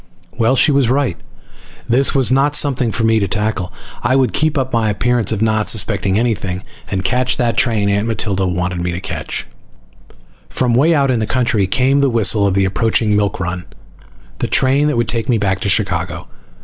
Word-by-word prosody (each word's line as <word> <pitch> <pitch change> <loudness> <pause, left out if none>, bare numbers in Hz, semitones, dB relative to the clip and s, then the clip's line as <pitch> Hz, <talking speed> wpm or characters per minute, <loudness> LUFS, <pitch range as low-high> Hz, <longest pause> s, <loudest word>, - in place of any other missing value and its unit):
Well, 115 +3 +2
she 150 - +3
was 135 -4 +2
right. 130 -7 0 0.7
This 130 +5 +2
was 130 -2 +2
not 140 +3 +2
something 130 -5 +2
for 115 - -2
me 110 0 +3
to 100 - -1
tackle. 105 -3 -2 0.3
I 130 +2 +1
would 130 -2 +1
keep 155 -1 +1
up 130 -1 -2
my 115 -2 +1
appearance 120 +1 0
of 110 -1 -1
not 110 -1 +1
suspecting 100 -2 +1
anything, 100 -5 -2 0.2
and 95 -1 -3
catch 125 +4 +1
that 120 -3 0
train 110 -3 +1
Aunt 100 +2 0
Matilda 100 -4 -2
wanted 90 0 -2
me 90 0 -2
to 85 - -4
catch. 90 -5 -5 1.0
From 125 -2 0
way 155 +7 +3
out 140 -2 +2
in 120 - 0
the 110 - -2
country 115 -5 0
came 130 +7 +1
the 140 -1 +2
whistle 105 -3 +2
of 95 - -1
the 100 0 +2
approaching 110 +2 +1
milk 100 -2 -1
run, 90 0 -4 0.8
the - - -1
train 135 +3 +2
that 150 - -1
would 120 -1 0
take 115 +2 -2
me 120 - +3
back 95 -2 -1
to 100 - -2
Chicago. 95 - -1
115 Hz, 200 wpm, -16 LUFS, 100-130 Hz, 1.0 s, she